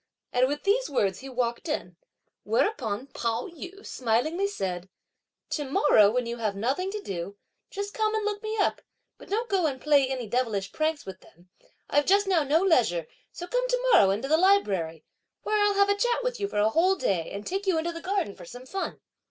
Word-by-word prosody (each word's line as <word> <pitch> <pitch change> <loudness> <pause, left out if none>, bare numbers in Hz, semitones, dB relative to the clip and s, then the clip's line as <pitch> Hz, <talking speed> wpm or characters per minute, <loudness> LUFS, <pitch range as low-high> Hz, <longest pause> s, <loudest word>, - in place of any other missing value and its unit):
and 250 +1 +4
with 290 +2 -3
these 455 +5 +2
words, 195 -8 0
he 270 - -9
walked 245 +4 -2
in; 180 - -3 0.5
whereupon 230 - 0
Pao 235 -3 -2
yü 365 +4 -10
smilingly 265 - 0
said: 185 - -4 0.6
"To 295 - -1
morrow 265 -6 +4
when 250 +2 0
you 235 +1 -4
have 215 -3 -2
nothing 265 - -1
to 420 +1 -5
do, 190 +2 -5 0.3
just 405 +1 -5
come 435 -1 0
and 435 -1 -1
look 415 -1 -2
me 435 0 -3
up; 405 - +1 0.4
but - - -14
don't 455 +4 -1
go 380 -6 +2
and 265 -3 -3
play 285 -2 +4
any 260 -2 -3
devilish 215 -4 -1
pranks 310 -1 -1
with 190 -1 -9
them! 175 +2 -22 0.4
I've 290 0 +2
just 400 +2 +4
now 370 -4 +3
no 305 +5 +2
leisure, 225 - +2 0.3
so 350 - -7
come - - 0
to - - +1
morrow, 195 - +7
into 210 +7 -1
the 310 +3 +4
library, 195 - +2 0.4
where 425 0 +1
I'll 410 -1 +2
have 400 0 +4
a - - +5
chat 485 +3 0
with - - -2
you 400 - -1
for - - -5
a 210 +1 +4
whole 360 +10 +3
day, 185 - -1
and 200 +1 -7
take 390 +2 -3
you 365 -4 +3
into 330 +2 -1
the 335 0 -8
garden 380 - -1
for - - -12
some 245 +8 -10
fun!" 385 +8 -4
295 Hz, 210 wpm, -27 LUFS, -, 0.6 s, morrow